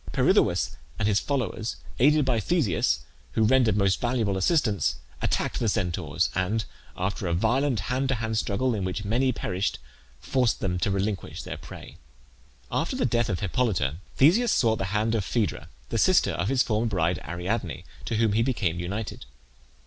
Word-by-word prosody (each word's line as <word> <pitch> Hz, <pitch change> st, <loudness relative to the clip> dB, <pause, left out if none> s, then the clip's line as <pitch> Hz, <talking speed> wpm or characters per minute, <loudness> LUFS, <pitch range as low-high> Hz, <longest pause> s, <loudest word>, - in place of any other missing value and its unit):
Pirithoeus -, -, +2 dB, 0.2 s
and 105 Hz, -, +1 dB
his 105 Hz, -1 st, +3 dB
followers, 120 Hz, -5 st, -2 dB, 0.2 s
aided 150 Hz, +3 st, +5 dB
by 120 Hz, -3 st, +2 dB
Theseus, 100 Hz, -, +1 dB, 0.3 s
who 110 Hz, -, +2 dB
rendered 115 Hz, -2 st, +4 dB
most 100 Hz, -2 st, +2 dB
valuable 120 Hz, -5 st, 0 dB
assistance, 105 Hz, -, +2 dB, 0.3 s
attacked -, -, 0 dB
the 115 Hz, -, +1 dB
Centaurs, 90 Hz, -4 st, -1 dB
and 100 Hz, +4 st, 0 dB, 0.3 s
after 95 Hz, +1 st, -2 dB
a 85 Hz, -, +1 dB
violent 120 Hz, +4 st, +1 dB
hand 130 Hz, +5 st, -1 dB
to 130 Hz, -, +2 dB
hand 110 Hz, -1 st, -2 dB
struggle 125 Hz, +6 st, 0 dB
in 100 Hz, -3 st, -2 dB
which 95 Hz, +2 st, -3 dB
many 125 Hz, +5 st, +2 dB
perished, 95 Hz, -4 st, -2 dB, 0.4 s
forced 120 Hz, -, +1 dB
them 90 Hz, -2 st, -1 dB
to 100 Hz, -, +1 dB
relinquish 100 Hz, 0 st, -2 dB
their -, -, -5 dB
prey. -, -, -11 dB, 0.7 s
After -, -, -1 dB
the -, -, +1 dB
death 120 Hz, -2 st, +1 dB
of 90 Hz, -5 st, -2 dB
Hippolyte 95 Hz, -, 0 dB, 0.2 s
Theseus 215 Hz, -, +5 dB
sought 110 Hz, -3 st, +2 dB
the 95 Hz, -, -1 dB
hand 105 Hz, +3 st, 0 dB
of 110 Hz, -3 st, +1 dB
Phaedra, 100 Hz, -8 st, -2 dB, 0.2 s
the 115 Hz, -, -1 dB
sister 185 Hz, -, +4 dB
of -, -, -1 dB
his 130 Hz, -1 st, +3 dB
former 110 Hz, +1 st, 0 dB
bride 90 Hz, -4 st, 0 dB
Ariadne, 90 Hz, +3 st, -3 dB, 0.2 s
to 115 Hz, -, -2 dB
whom 110 Hz, -1 st, +2 dB
he 110 Hz, -, +3 dB
became 105 Hz, -9 st, 0 dB
united. 100 Hz, +5 st, -4 dB
110 Hz, 170 wpm, -26 LUFS, 95-125 Hz, 0.7 s, aided